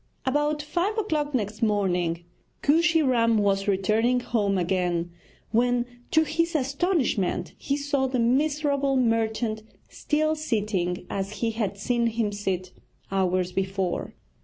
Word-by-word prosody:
About 295 +2 +1
five 355 +8 -1
o'clock 305 -9 -1
next 210 -1 -2
morning 180 -6 +1 0.4
Kooshy 325 +2 +4
Ram 230 -4 +3
was 200 -1 +1
returning 215 +5 +2
home 205 -5 0
again, 175 -1 0 0.4
when, 245 +1 +2 0.2
to 315 - +4
his 335 +2 -1
astonishment, 270 - 0
he 280 - -2
saw 280 -2 0
the 260 0 -1
miserable 280 +2 +1
merchant 225 -2 0 0.3
still 310 +1 0
sitting 210 - -1
as 195 +1 -3
he 225 +1 -1
had 210 -3 -2
seen 235 +3 +1
him 225 -2 -1
sit 190 -3 -3 0.4
hours 185 -1 +1
before. 190 -1 -2
230 Hz, 125 wpm, -26 LUFS, 195-285 Hz, 0.4 s, Kooshy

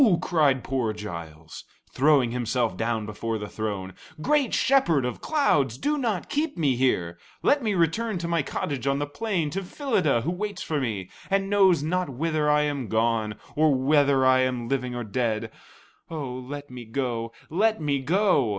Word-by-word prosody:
cried 145 -7 +2
poor 125 -5 -1
Giles, 85 -6 -8 0.3
throwing 135 -3 +4
himself 125 0 -1
down 115 -1 -1
before 110 +1 -3
the 105 -1 -6
throne. 100 -4 -4 0.3
"Great 290 - +2
Shepherd 215 - +3
of 125 - -4
Clouds, 150 - +1
do 295 - 0
not 230 -10 -1
keep 295 - -1
me 145 -6 +2
here. 85 -10 0 0.2
Let 285 0 +4
me 215 -4 0
return 185 +6 +1
to 170 0 -3
my 170 -1 +1
cottage 140 -1 -3
on 140 0 +2
the 145 - -1
plain, 165 0 -2
to 195 - -2
Phyllida 185 - 0
who 160 - -1
waits 205 +3 -4
for 150 -3 -1
me, 105 -7 -3 0.2
and 195 0 0
knows 190 -6 +4
not 180 +1 -1
whither 150 +3 0
I 150 0 +4
am 145 -5 -2
gone 110 -1 0 0.2
or 155 -2 +4
whether 140 0 +3
I 130 0 +5
am 125 -2 0
living 125 -1 -2
or 120 - -3
dead. 115 0 -2 0.6
Oh, 145 -6 -4
let 140 +2 -7
me 125 -1 -8
go, 115 -1 -3 0.2
let 215 +5 +2
me 145 -3 0
go!" 170 - +2
140 Hz, 175 wpm, -26 LUFS, 120-175 Hz, 0.6 s, I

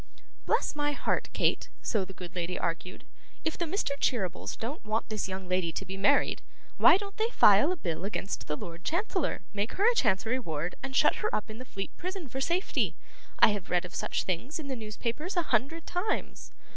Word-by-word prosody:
'Bless - - +2
my 290 0 +1
heart, - - 0
Kate!' - - +1
so 215 -4 +1
the 185 - -8
good 180 -1 -9
lady 175 0 -2
argued; 170 +2 -3 0.4
'if 320 - 0
the 345 - -1
Mr. 350 -2 -1
Cheerybles 195 -9 0
don't 250 +7 -4
want 215 +1 -1
this 215 -3 -2
young 190 0 -5
lady 180 -2 +1
to - - -3
be 190 - -5
married, 195 +1 +3 0.4
why - - +8
don't 400 0 -8
they 445 +1 +2
file 210 - +6
a - - 0
bill 170 - -3
against 200 0 -3
the 150 - -1
Lord 170 +2 -8
Chancellor, 360 - 0
make 205 +2 -1
her 405 +4 +3
a 485 - +6
Chancery 225 - +2
ward, 165 - -3
and 270 0 -5
shut - - +5
her 430 - 0
up 215 - -3
in 220 - -9
the 255 - -7
Fleet 195 -5 -6
prison 370 -3 -5
for 265 +2 -4
safety? 345 +7 +1 0.4
I - - +8
have 205 -3 -3
read 180 0 +2
of 180 - -9
such - - -1
things 185 - -2
in 305 -4 -6
the 265 - -1
newspapers 235 - -3
a 345 - +3
hundred 285 +9 +1
times. 360 +5 -2
225 Hz, 210 wpm, -30 LUFS, -, 0.4 s, why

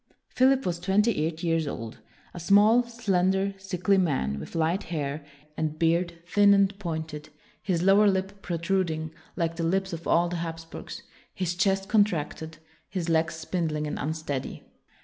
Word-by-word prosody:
Philip 265 +1 +3
was 170 -1 -1
twenty 195 -1 +2
eight 165 0 -6
years 165 -2 +1
old; 115 -4 -6 0.3
a 175 - -7
small, 205 +7 +5
slen 215 -7 0
der, 195 +1 0
sickly 195 0 +1
man, 130 - 0
with 75 - -9
light 165 +4 +1
hair, 150 -2 -3 0.3
and 155 -1 -2
beard 170 +1 0
thin 200 +2 +5
and 200 0 +3
pointed, 160 -4 -5 0.3
his 175 -3 -1
lower 200 +2 +6
lip 195 0 -1
protruding 165 -3 -1 0.2
like 165 -2 -1
the 170 - -2
lips 190 +2 0
of 165 0 -6
all 170 +1 +3
the 175 0 -3
Hapsburgs, 165 -1 -7 0.3
his 180 -2 -1
chest 195 +1 +1
contracted, 160 -7 0 0.3
his 180 -3 -3
legs 165 +1 +1
spindling 160 -2 -2
and 150 - -4
unsteady. 150 -3 -4
170 Hz, 155 wpm, -27 LUFS, 160-195 Hz, 0.3 s, lower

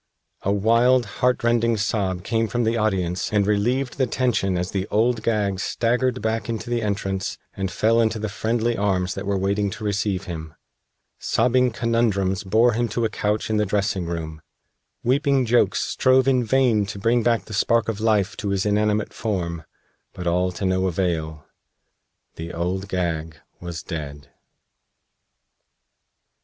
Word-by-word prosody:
A 100 - 0
wild, 115 +5 +3 0.2
heartrending 120 -2 +2
sob 100 -4 -1
came 115 +1 0
from 120 +3 -1
the 115 +1 +1
audience 95 -5 -1
and 105 -2 +2
relieved 120 +6 0
the 130 - +3
tension 110 -7 0
as 90 +1 -2
the 95 0 -2
Old 115 +2 +1
Gag 105 -4 0
staggered 125 +3 0
back 110 +1 -1
into 115 +1 -4
the 120 -1 0
entrance 100 -2 -2 0.2
and 95 -1 -3
fell 115 +2 +3
into 110 0 +1
the 110 0 -3
friendly 115 +3 -1
arms 95 -3 0
that 95 0 -6
were 100 -1 +1
waiting 100 +2 0
to 110 +2 -8
receive 100 -2 -1
him. 80 -3 -7 0.6
Sobbing 125 0 +2
Conundrums 110 -5 0
bore 110 +5 +3
him 120 +2 0
to 115 +2 -1
a - - 0
couch 105 +1 -1
in 110 - +1
the 105 - +2
dressing 100 -3 -1
room. 80 -2 -5 0.6
Weeping 135 +1 +2
Jokes 110 -5 +2
strove 130 0 +3
in 130 -2 +3
vain 115 -4 +2
to 100 - -6
bring 115 +4 +2
back 115 0 +1
the 110 - -9
spark 115 +2 +2
of 110 -2 -3
life 105 -3 +2
to 105 - -3
his 100 0 0
inanimate 105 0 +1
form. 85 -7 -3 0.5
But 90 - -7
all 90 +1 +1
to 85 +3 -4
no 95 0 +1
avail. 80 -4 -2 0.9
The 85 +1 -6
Old 90 +3 -2
Gag 80 -4 -2 0.2
was 85 -2 -6
dead. 75 -3 -7
105 Hz, 160 wpm, -23 LUFS, 95-115 Hz, 0.9 s, wild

